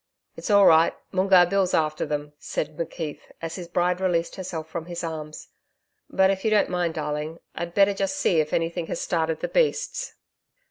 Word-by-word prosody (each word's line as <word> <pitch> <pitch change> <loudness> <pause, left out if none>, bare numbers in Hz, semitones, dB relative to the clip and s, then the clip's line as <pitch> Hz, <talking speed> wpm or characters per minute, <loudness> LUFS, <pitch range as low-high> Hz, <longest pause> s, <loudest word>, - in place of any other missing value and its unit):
'It's - - -6
all 200 -1 +6
right, 160 +1 +6 0.2
Moongarr 185 -1 +5
Bill's 190 0 +1
after 155 -1 0
them,' 150 0 -3
said 155 0 -4
McKeith, 160 -2 -5 0.2
as 165 -1 -5
his 180 -2 -6
bride 180 +1 0
released 170 -3 0
herself 175 -4 -5
from 165 +1 -6
his 175 -1 -5
arms. 155 -2 -6 0.6
'But 190 0 +4
if 190 -1 -3
you 220 - +2
don't 215 -1 +3
mind 175 -2 -1
darling. 150 +1 -3 0.2
I'd 170 0 -5
better 200 0 +5
just 195 -1 -2
see 170 - +2
if 155 -1 0
anything 165 0 -1
has - - -3
started 160 -2 -1
the - - -1
beasts.' - - 0
170 Hz, 185 wpm, -25 LUFS, 160-190 Hz, 0.6 s, all